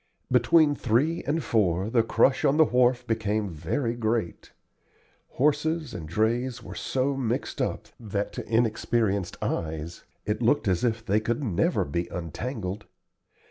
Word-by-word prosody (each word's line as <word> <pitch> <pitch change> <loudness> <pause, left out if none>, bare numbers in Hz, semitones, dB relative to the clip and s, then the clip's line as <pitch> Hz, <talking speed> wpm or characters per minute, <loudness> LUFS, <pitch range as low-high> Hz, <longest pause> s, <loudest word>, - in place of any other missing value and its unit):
Between 145 +5 +5
three 145 +6 +1
and 155 +3 0
four 95 -2 +1
the 120 -1 +4
crush 130 +3 +2
on 140 +2 +3
the 160 - +7
wharf 125 -1 +2
became 110 -3 -1
very 115 - -2
great. 115 -5 -2 0.8
Horses 150 +2 0
and 80 -3 -7
drays 115 +6 0
were - - -8
so 135 +1 -1
mixed 125 -2 -2
up - - -2
that 105 -3 -3
to - - -6
inexperienced 110 -4 0
eyes 80 +1 -3 0.2
it - - -1
looked - - +2
as 90 +1 +1
if 115 -2 0
they 105 -1 +2
could 120 +5 -2
never 105 -9 +1
be 85 +5 -2
untangled. 95 - -5
115 Hz, 140 wpm, -26 LUFS, 100-130 Hz, 0.8 s, the